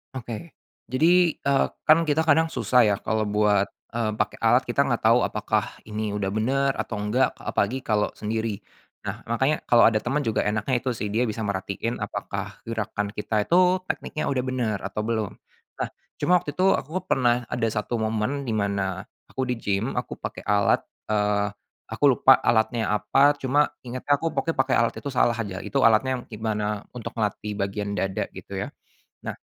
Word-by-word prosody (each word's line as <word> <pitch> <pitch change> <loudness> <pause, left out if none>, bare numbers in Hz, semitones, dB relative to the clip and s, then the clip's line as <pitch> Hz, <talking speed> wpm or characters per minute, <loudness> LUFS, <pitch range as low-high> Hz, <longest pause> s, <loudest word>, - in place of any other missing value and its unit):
Oke, 120 +6 -6 0.4
jadi, 170 +5 +4
eee, 140 0 +2 0.2
kan 160 +2 +6
kita 155 -1 +1
kadang 160 +2 +4
susah 120 0 +3
ya 105 -2 +3
kalau 110 0 0
buat, 105 -1 +3 0.3
eee, 115 -2 0
pakai - - 0
alat - - +5
kita - - +2
nggak - - 0
tahu - - +5
apakah - - -1 0.2
ini 105 0 -3
udah 100 -1 -2
bener 135 +7 +1
atau - - -3
enggak 105 +6 +1
apalagi 120 +7 -1
kalau 105 -5 0
sendiri, 110 -1 -3 0.5
nah - - -5
makanya 135 +6 0
kalau 120 -1 +6
ada 110 -1 +1
teman 135 +5 0
juga 115 -7 0
enaknya 110 +4 0
itu 130 - 0
sih 115 -3 -3
dia 110 +4 +1
bisa 110 -2 -2
merhatiin 100 +4 -3
apakah - - -5
gerakan 110 -2 -2
kita 105 0 -1
itu 180 +1 +4
tekniknya 155 - -3
udah 130 -2 0
bener 125 -5 -1
atau 100 +2 -4
belum, 110 -2 -1 0.5
nah - - 0 0.3
cuma 180 -1 +3
waktu 145 - -4
itu 190 +1 +5
aku 160 +6 -3
pernah 120 -4 +2
ada 120 -2 -1
1 105 +2 -2
momen 110 +5 -1
dimana, 100 -4 -2 0.2
aku 130 -1 -2
di-gym 115 -1 -1
aku - - -4
pakai - - -6
alat, 100 -1 +2 0.2
eee, 105 -1 +1 0.4
aku 110 +5 -7 0.2
lupa 130 - +8
alatnya 110 -2 +2
apa 135 +7 +4
cuma 145 +3 +2
ingetnya 130 +3 -5
aku 165 - -1
pokoknya 165 0 -1
pakai 135 - +3
alat 115 0 +3
itu - - -7
salah 125 -2 +2
aja 100 -4 -3
itu 140 - -1
alatnya 125 +2 +4
gimana 105 -1 -2
untuk 120 - -5
melatih 105 -1 -2
bagian 100 +1 -2
dada 95 -1 -1
gitu - - -9
ya, - - -3 0.6
nah, - - -3
115 Hz, 175 wpm, -25 LUFS, 105-130 Hz, 0.6 s, lupa